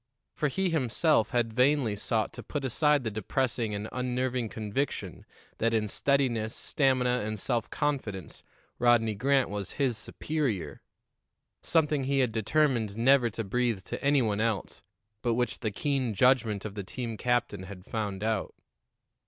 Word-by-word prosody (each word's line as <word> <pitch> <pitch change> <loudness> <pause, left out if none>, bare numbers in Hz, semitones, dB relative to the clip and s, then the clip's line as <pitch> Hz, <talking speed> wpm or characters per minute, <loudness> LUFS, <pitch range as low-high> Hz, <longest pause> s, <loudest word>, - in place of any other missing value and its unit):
For 150 - 0
he 185 +6 0
himself 140 -3 +2
had 120 -3 0
vainly 125 -2 +3
sought 110 +1 -1
to - - -7
put 145 -2 -4
aside 150 +2 +2
the 110 - -2
depressing 115 +1 -1
and 105 +2 -4
unnerving 125 -1 -1
conviction 110 +7 -3 0.3
that 115 0 +2
in 110 -1 +1
steadiness, 120 -2 +1
stamina 130 -4 +1
and 110 0 -3
self 120 +1 -1
confidence, 120 - -3 0.4
Rodney 120 -2 +4
Grant 135 +2 +2
was 100 -2 -4
his 130 -6 0
superior; 120 - -3 0.8
something 150 -4 +1
he 140 +1 +1
had 130 -4 +2
determined 115 -2 +1
never 125 +1 +4
to 115 +1 -4
breathe 115 -1 0
to - - -6
any 140 -2 +4
one 105 -1 0
else, 115 -3 -2 0.4
but 120 -2 +1
which 125 0 -1
the 110 - -1
keen 130 +1 -1
judgment 115 -4 +3
of 105 - -5
the 100 -1 -5
team 115 +3 -5
captain 120 -4 0
had 95 0 -10
found 105 -3 -3
out. 110 -2 -1
120 Hz, 155 wpm, -29 LUFS, 110-135 Hz, 0.8 s, Rodney